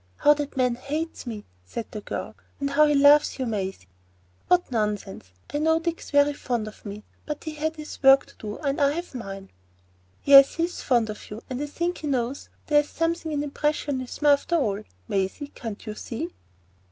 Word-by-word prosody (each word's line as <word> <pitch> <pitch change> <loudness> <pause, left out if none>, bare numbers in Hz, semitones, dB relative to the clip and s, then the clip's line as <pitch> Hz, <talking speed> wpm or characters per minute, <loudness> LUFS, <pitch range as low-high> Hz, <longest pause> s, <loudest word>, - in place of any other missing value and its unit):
"How 295 - +6
that 290 -2 -5
man 250 -2 +3
hates 300 +2 -4
me!" 215 -3 -6 0.2
said 155 - -5
the 210 - -6
girl. - - -5 0.3
"And 280 0 -1
how 300 +2 +5
he 295 - +3
loves 285 +1 +6
you, 260 - -2
Maisie!" 195 - -3 0.6
"What 360 -5 +3
nonsense? 210 - -2 0.2
I 290 - 0
knew 320 +1 +3
Dick's 335 0 -4
very 285 0 +4
fond 240 -6 -2
of 215 - -11
me, 205 0 -7 0.2
but 300 -1 -4
he 315 - -5
had 315 +1 -2
his 305 -1 -9
work 270 0 +7
to - - -19
do, 210 -1 -6
and 285 0 -1
I 280 0 +4
have 345 0 -5
mine." 195 -5 -7 0.7
"Yes, 275 -1 +8
he 330 - 0
is 350 +1 -3
fond 235 -4 +2
of 210 - -10
you, 215 +3 -8
and 255 +2 -3
I 295 - -2
think 345 +4 -2
he 305 - -5
knows 260 -1 -2 0.2
there 295 -1 +5
is 295 - -2
something 330 0 -1
in 290 -1 -1
impressionism, 290 -2 -2
after 290 +4 +4
all. 210 -10 0 0.3
Maisie, 195 +9 -2
can't 225 -6 -7
you 215 - -4
see?" 210 -4 -5
"See? - - -32
280 Hz, 200 wpm, -25 LUFS, 225-300 Hz, 0.7 s, Yes